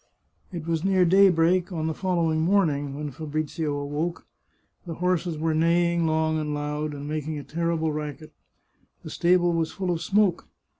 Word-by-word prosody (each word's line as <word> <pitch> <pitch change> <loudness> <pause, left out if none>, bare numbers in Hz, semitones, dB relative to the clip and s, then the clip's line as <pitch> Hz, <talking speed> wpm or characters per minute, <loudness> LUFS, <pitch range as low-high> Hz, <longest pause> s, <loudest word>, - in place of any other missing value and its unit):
It 170 -4 -6
was 165 -1 -1
near 190 -1 +3
daybreak 180 0 +4
on 160 -3 -3
the 160 - -1
following 170 -3 0
morning 155 -6 +1
when 150 0 -5
Fabrizio 155 +1 -3
awoke. 145 +4 -3 0.6
The 165 - -5
horses 180 -1 -1
were 160 +1 0
neighing 170 +1 +2
long 160 0 +1
and 150 -1 -2
loud, 150 +1 -3
and 145 0 -7
making 155 0 -3
a 145 - -6
terrible 165 0 -1
racket. 150 +1 -6 0.7
The - - -8
stable 175 0 +3
was 165 -1 -1
full 185 -2 -2
of 165 -2 -2
smoke. 195 -1 +1
160 Hz, 160 wpm, -25 LUFS, 150-175 Hz, 0.7 s, daybreak